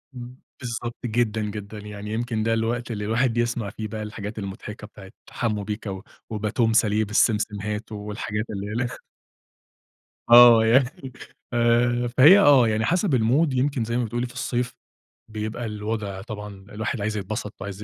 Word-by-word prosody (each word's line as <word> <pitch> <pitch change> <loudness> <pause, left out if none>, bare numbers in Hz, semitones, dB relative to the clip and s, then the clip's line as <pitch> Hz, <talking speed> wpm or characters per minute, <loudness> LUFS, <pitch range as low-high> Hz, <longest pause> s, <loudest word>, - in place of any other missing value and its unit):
إمم، 125 0 -9 0.2
بالضبط 120 -1 -5
جدًا، 110 -1 0
جدًا. 105 0 -6
يعني 105 0 -7
يمكن 115 -1 -2
ده 115 +1 +1
الوقت 115 +2 -1
اللي 105 -2 -4
الواحد 115 +2 +1
يسمع 120 -3 -1
فيه 110 +2 -6
بقى 110 0 -5
الحاجات 105 0 -6
المضحكة 105 +2 -7
بتاعة 95 -2 -14 0.2
حمّو 110 -3 -2
بيكا 105 0 -5
و 95 0 -6 0.3
وباتون 110 +1 0
ساليه 110 -1 +3
بالسمسمهات 105 0 0
والحاجات 105 0 -4
اللي 100 -1 -5
هيلخ 120 +2 -2 1.4
آه. 120 -1 +9
يعني 130 +2 +1 0.4
آآ 120 +1 +2
فهي 155 +10 +9
آه. 140 - +6
يعني 110 0 0
حسب 180 - +2
الMood 125 +8 +3
يمكن 130 -2 0
زي 115 +1 -2
ما 125 - +1
بتقولي 120 +2 -2
في 125 - -13
الصيف، 125 0 -2 0.6
بيبقى 110 +2 -4
الوضع 105 -2 -4
طبعًا 105 -2 -8
الواحد 110 +2 -3
عايز 105 +1 -2
يتبسط 105 +1 -4
وعايز 100 +1 -6
110 Hz, 155 wpm, -24 LUFS, 105-120 Hz, 1.4 s, آه